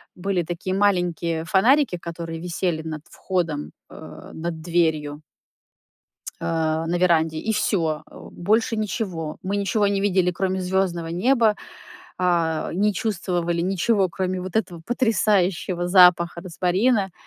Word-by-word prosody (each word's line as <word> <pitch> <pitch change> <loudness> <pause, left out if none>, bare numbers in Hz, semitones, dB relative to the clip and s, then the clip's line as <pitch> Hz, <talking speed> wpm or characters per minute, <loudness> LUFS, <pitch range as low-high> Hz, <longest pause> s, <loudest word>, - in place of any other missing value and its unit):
Были 185 -1 -1
такие 175 +3 -4
маленькие 175 -5 +1
фонарики, 230 - +3
которые 165 -1 -6
висели 170 -1 -2
над 155 -1 -6
входом, 170 -6 -3 0.2
э, - - -11
над 165 0 -5
дверью 155 -3 0 1.2
А, 160 -1 -1
на 175 +1 0
веранде, 165 -3 +2
и 220 - -2
всё. 160 -7 0
Э, - - -15 0.2
больше 220 +5 +1
ничего. 190 -7 -3
Мы 195 +2 -1
ничего 205 +1 +1
не 200 -1 0
видели, 185 -3 +2
кроме 190 +1 -1
звёздного 180 -2 -1
неба. 220 +5 +2 0.6
А, 170 -3 0
не 205 +4 +1
чувствовали 175 -4 -1
ничего, 190 +2 +1
кроме 185 +1 -2
вот 185 0 -7
этого 180 -6 -1
потрясающего 195 -7 +1
запаха 180 -2 +5
розмарина. 190 +4 +1
180 Hz, 125 wpm, -23 LUFS, 165-195 Hz, 1.2 s, запаха